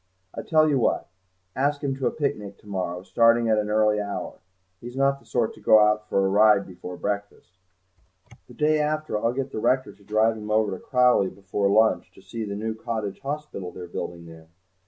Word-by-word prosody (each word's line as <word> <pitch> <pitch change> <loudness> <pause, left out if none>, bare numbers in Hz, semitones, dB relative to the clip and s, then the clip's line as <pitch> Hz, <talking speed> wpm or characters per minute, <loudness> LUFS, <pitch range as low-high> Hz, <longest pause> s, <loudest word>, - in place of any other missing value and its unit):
I - - -5
tell 155 -1 +3
you 140 -3 +2
what: - - 0 0.5
ask 145 +2 0
him 135 -2 -1
to 135 - 0
a - - 0
picnic 105 -9 -3
to 105 - -19
morrow, 90 -2 -4
starting 115 +2 +3
at 110 -1 +3
an 105 0 -2
early 105 0 +2
hour; 100 0 -5 0.4
he's 120 +1 -9
not 140 0 +2
the - - -24
sort 120 -3 0
to - - -16
go 110 - +6
out 105 0 +3
for 95 - +2
a - - +3
ride 105 0 +4
before 90 -1 -9
breakfast. 100 -3 -4 1.0
The - - -15
day 155 0 +2
after 155 -2 -1
I'll 115 - +2
get 135 +1 -4
the - - -4
rector 130 +4 +1
to 100 - -23
drive 110 +2 +1
him 105 0 -8
over 110 -1 +2
to 95 - -7
Crowleigh 125 -7 +3
before 100 +1 -1
lunch, 110 +2 +2
to - - -17
see 115 -1 -6
the 100 -1 -5
new 110 +2 -3
cottage 110 -3 -4
hospital 140 -10 -5
they're 90 - -8
building 85 0 -6
there. 80 -1 -13
110 Hz, 210 wpm, -25 LUFS, 100-130 Hz, 1.0 s, go